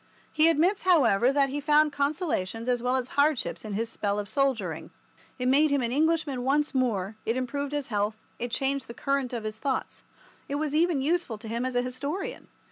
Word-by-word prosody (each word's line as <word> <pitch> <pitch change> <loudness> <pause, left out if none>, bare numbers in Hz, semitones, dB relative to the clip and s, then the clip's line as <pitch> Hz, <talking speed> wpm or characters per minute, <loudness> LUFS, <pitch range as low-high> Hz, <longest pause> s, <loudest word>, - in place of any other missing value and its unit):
He 310 +1 +5
admits, 340 +5 +2
however, 265 - +4
that 275 -1 +2
he 290 +2 -3
found 300 0 +4
consolations 280 - -1
as 245 -1 +1
well 250 +1 +1
as 255 -1 -2
hardships 285 -1 +1
in 215 -2 -5
his 225 +3 -1
spell 205 -2 -2
of 205 -1 -3
soldiering. 230 - -1 0.5
It 250 -1 -1
made 290 +4 +5
him 280 -2 +1
an 235 - -1
Englishman 300 -2 +1
once 295 +3 +1
more, 220 -6 0
it 230 +3 -1
improved 280 +3 -3
his 290 -3 -3
health, 210 0 -2
it 240 - -2
changed 270 +3 -1
the 235 - -9
current 275 -1 -1
of 235 -3 -4
his 215 0 -5
thoughts. 275 -2 -3 0.5
It 280 - -2
was 295 0 -2
even 320 -3 +2
useful 315 -7 0
to 220 +2 -10
him 235 +3 -2
as 255 - -5
an 245 - +2
historian. 280 +9 -4
265 Hz, 205 wpm, -27 LUFS, 235-295 Hz, 0.5 s, He